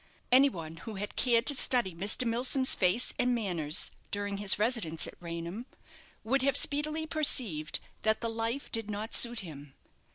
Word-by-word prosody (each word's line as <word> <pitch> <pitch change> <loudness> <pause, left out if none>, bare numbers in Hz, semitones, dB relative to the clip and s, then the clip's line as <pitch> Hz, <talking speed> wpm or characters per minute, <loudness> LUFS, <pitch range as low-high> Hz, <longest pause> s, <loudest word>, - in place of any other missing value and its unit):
Any 270 +3 +5
one 165 -7 -9
who 210 +6 -10
had 205 +2 -7
cared 235 -2 +1
to 290 - +4
study 245 -8 +2
Mr. 200 +8 -2
Milsom's 255 +3 +4
face 190 +6 0
and 250 0 +1
manners 175 -8 0 0.2
during 205 0 -4
his 200 -1 0
residence 210 -8 +2
at - - -7
Raynham, 170 +7 -8 0.6
would 260 +5 0
have 275 +1 +2
speedily 305 +2 0
perceived 240 - +2 0.2
that 220 0 0
the 230 - -3
life 230 +4 -5
did 225 -2 -1
not 210 +2 -6
suit 235 -1 +4
him. 145 -6 -12
225 Hz, 165 wpm, -29 LUFS, 180-250 Hz, 0.6 s, Any